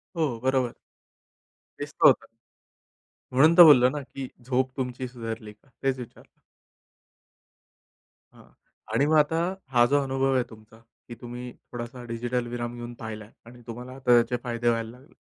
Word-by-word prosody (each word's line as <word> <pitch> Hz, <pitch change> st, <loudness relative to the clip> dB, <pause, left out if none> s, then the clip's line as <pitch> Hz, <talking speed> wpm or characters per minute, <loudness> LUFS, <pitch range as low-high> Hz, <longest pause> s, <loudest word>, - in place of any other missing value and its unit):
हो, 150 Hz, -9 st, -1 dB
बरोबर. 130 Hz, -2 st, 0 dB, 1.0 s
दिसलं -, -, +3 dB
होतं -, -, +6 dB
का? -, -, -24 dB, 1.0 s
म्हणून 155 Hz, +7 st, +5 dB
तर 175 Hz, -, +12 dB
बोललो 130 Hz, -6 st, +8 dB
ना, 145 Hz, +3 st, -4 dB, 0.2 s
की 135 Hz, -1 st, -4 dB, 0.2 s
झोप 130 Hz, 0 st, 0 dB
तुमची 125 Hz, -1 st, -3 dB
सुधारली 115 Hz, -3 st, -7 dB
का? 105 Hz, +6 st, -31 dB
तेच 135 Hz, -1 st, 0 dB
विचारलं. 120 Hz, -, -12 dB, 1.9 s
हां, -, -, -18 dB, 0.5 s
आणि 140 Hz, -, +3 dB
मग 155 Hz, +2 st, +2 dB
आता, 155 Hz, +2 st, +3 dB, 0.3 s
हा 120 Hz, -2 st, +4 dB
जो 145 Hz, +3 st, +3 dB
अनुभव 135 Hz, 0 st, 0 dB
आहे 125 Hz, -, +2 dB
तुमचा, 110 Hz, 0 st, -16 dB, 0.3 s
की 120 Hz, -, -8 dB
तुम्ही 125 Hz, +1 st, -7 dB, 0.2 s
थोडासा 120 Hz, +1 st, -7 dB
डिजिटल 120 Hz, +1 st, -2 dB
विराम 120 Hz, 0 st, -4 dB
घेऊन 120 Hz, 0 st, -7 dB
पाहिलाय 110 Hz, -1 st, -8 dB
आणि 120 Hz, +1 st, -14 dB
तुम्हाला 120 Hz, +2 st, -8 dB
आता 130 Hz, -2 st, 0 dB
त्याचे 120 Hz, +1 st, +2 dB
फायदे 120 Hz, -1 st, 0 dB
व्हायला 115 Hz, -1 st, -1 dB
लागले. 130 Hz, +5 st, -18 dB
125 Hz, 155 wpm, -26 LUFS, 120-130 Hz, 1.9 s, तर